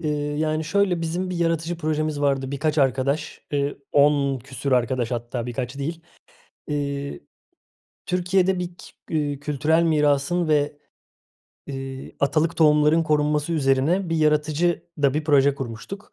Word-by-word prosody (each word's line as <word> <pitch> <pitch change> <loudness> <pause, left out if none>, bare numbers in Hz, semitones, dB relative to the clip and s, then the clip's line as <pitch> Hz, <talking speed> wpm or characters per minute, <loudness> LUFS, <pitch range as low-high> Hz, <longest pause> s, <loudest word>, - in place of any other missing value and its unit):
Iıı, 150 -2 -2
yani, 155 0 0
şöyle 185 +1 +1
bizim 175 +3 -2
bir 180 - -3
yaratıcı 165 0 0
projemiz 155 -2 -1
vardı. 135 -2 0
Birkaç 150 +2 -1
arkadaş, 135 +2 0
eee, 145 0 -1 0.2
10 140 -2 +3
küsur 130 +2 -4
arkadaş 125 -1 +1
hatta 120 0 -3
birkaç 125 +2 -4
değil. 160 +4 -4 0.7
Eee, 140 -1 -3 0.9
Türkiye'de 180 +1 +1
bir 180 - -2
k - - -13 0.3
eee, 145 -3 -1
kültürel 150 +3 +1
mirasın 155 +1 +2
ve, 145 -1 +1 0.9
eee, 135 -1 -7
atalık 155 +3 +1
tohumların 150 +1 +4
korunması 150 0 +1
üzerine 150 +5 +2
bir 165 - +1
yaratıcı 155 +2 +1 0.2
da 140 -1 +3
bir 155 +1 -1
proje 140 -2 +4
kurmuştuk. 135 - -7
150 Hz, 135 wpm, -23 LUFS, 140-160 Hz, 0.9 s, tohumların